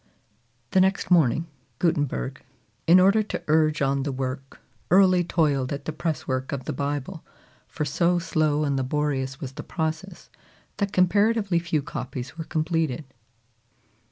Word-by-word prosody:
The 190 - +4
next 190 0 +1
morning, 165 -2 +4 0.3
Gutenberg, 145 - -1 0.5
in 175 +3 +8
order 200 +4 +5
to 215 - -5
urge 155 -1 +3
on 135 0 +1
the 140 +1 -2
work, 130 +1 -5 0.3
early 185 -1 +5
toiled 145 -6 +1
at 145 - -4
the - - -2
press 160 0 -3
work 130 0 -2
of 135 -2 -4
the - - -3
Bible; 145 +3 -3 0.4
for 150 - -3
so 170 +5 +2
slow 155 -3 +1
and 140 -2 0
laborious 135 0 -1
was 135 -5 -6
the - - -7
process 170 +3 -4 0.5
that 200 -1 -1
comparatively 200 +1 +2
few 165 -4 -1
copies 130 -1 -6
were 165 -1 -6
completed. 160 -3 -1
155 Hz, 145 wpm, -25 LUFS, 140-175 Hz, 0.5 s, in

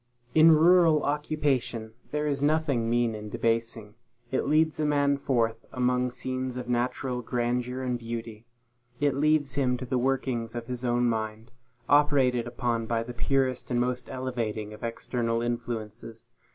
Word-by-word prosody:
In 160 +1 +7
rural 165 -1 +5
occupation, 145 -6 -1 0.2
there 150 0 -1
is 140 -2 -1
nothing 145 -6 +1
mean 120 -1 +2
and 105 -1 -7
debasing. 115 -2 -1 0.4
It 130 - 0
leads 155 +2 +2
a 155 - +1
man 145 -1 +2
forth 115 -4 0
among 125 0 +1
scenes 130 0 -4
of 125 -1 -5
natural 125 +1 -1
grandeur 125 +2 -2
and 125 -1 -1
beauty; 115 -1 -6 0.5
it 145 -1 +2
leaves 145 -1 +2
him 130 -2 +1
to 130 - -6
the 125 0 0
workings 125 -3 -1
of 120 -1 -4
his 125 +1 -5
own 120 0 +2
mind, 110 0 -2 0.4
operated 140 -5 +3
upon 120 -2 -2
by 115 0 0
the 120 +1 -7
purest 130 +1 0
and 120 -1 +1
most 125 0 -1
elevating 115 -5 -3
of 105 - -12
external 115 0 -2
influences. 115 -2 -5
125 Hz, 150 wpm, -27 LUFS, 115-135 Hz, 0.5 s, In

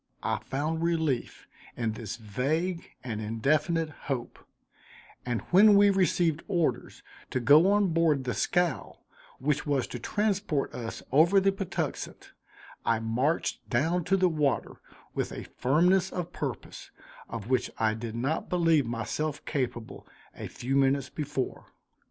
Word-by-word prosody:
I - - 0
found 155 +4 -2
relief 160 -7 -1 0.3
in 115 -2 0
this 110 -1 -6
vague 145 - -2
and 110 -4 -4
indefinite 150 +9 0 0.2
hope, 125 -4 -3 0.9
and 120 -2 -1
when 205 +3 +7
we 200 0 +6
received 175 -4 +2
orders 175 -5 -1 0.3
to 130 - -1
go 150 +10 +6
on 205 -2 +3
board 160 -4 +2
the 125 -1 -2
scow, 175 - 0 0.4
which 150 +2 -1
was 140 -4 +1
to 120 - -6
transport 200 - -1
us 115 -2 -6
over 165 +8 +5
the 195 +1 +3
Patuxent, 195 -2 -4 0.5
I 115 -1 +2
marched 125 +8 -1
down 165 +8 +1
to 195 - +3
the 185 -1 +4
water 150 -5 0 0.4
with - - -2
a - - -6
firmness 175 +7 +2
of 175 -1 -4
purpose 135 -7 -6 0.4
of 115 -3 -6
which 130 - +2
I 110 -1 +2
did 110 0 -6
not 135 +7 -2
believe 165 -7 +3
myself 135 +6 -3
capable, 120 -4 -4 0.3
a - - -6
few 130 +3 -3
minutes 135 -1 +2
before. 145 -3 -4
150 Hz, 140 wpm, -28 LUFS, 125-170 Hz, 0.9 s, when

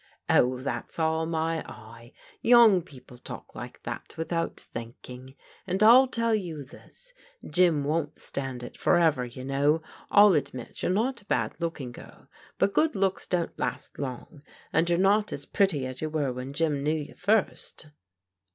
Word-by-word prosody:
"Oh, 125 +1 +3
that's 130 +2 -5
all 160 0 +1
my 165 0 -1
eye; 115 +2 -12 0.3
young 230 -6 +7
people 130 -6 -15
talk - - -9
like - - -9
that - - -7
without 165 +1 -2
thinking. 125 +3 -10 0.3
And 190 +3 +1
I 250 +4 +8
tell 230 -2 0
you 170 -8 -3
this, - - -15 0.3
Jim 170 -5 +3
won't 155 +1 -1
stand 135 -3 -5
it 120 - -9
forever, 160 -7 +3
you 125 +2 -9
know. 145 +4 +1 0.3
I'll 205 -1 +7
admit 140 -5 -3
you're - - 0
not 235 +5 0
a - - -24
bad - - 0
look 165 -2 -3
ing 125 -3 -6
girl, - - -14 0.3
but 200 - +2
good 315 -1 +2
looks 195 -1 0
don't 175 -2 -2
last - - -4
long, 140 +2 -6 0.3
and 170 - +2
you're 170 - +3
not 205 +3 +3
as - - -6
pretty 185 - +1
as 130 0 -7
you 155 - -2
were 145 -4 -1
when 125 +2 -6
Jim 150 -2 0
knew 150 +2 +1
you 150 -2 -6
first." 200 -4 -1
160 Hz, 170 wpm, -27 LUFS, 135-190 Hz, 0.3 s, I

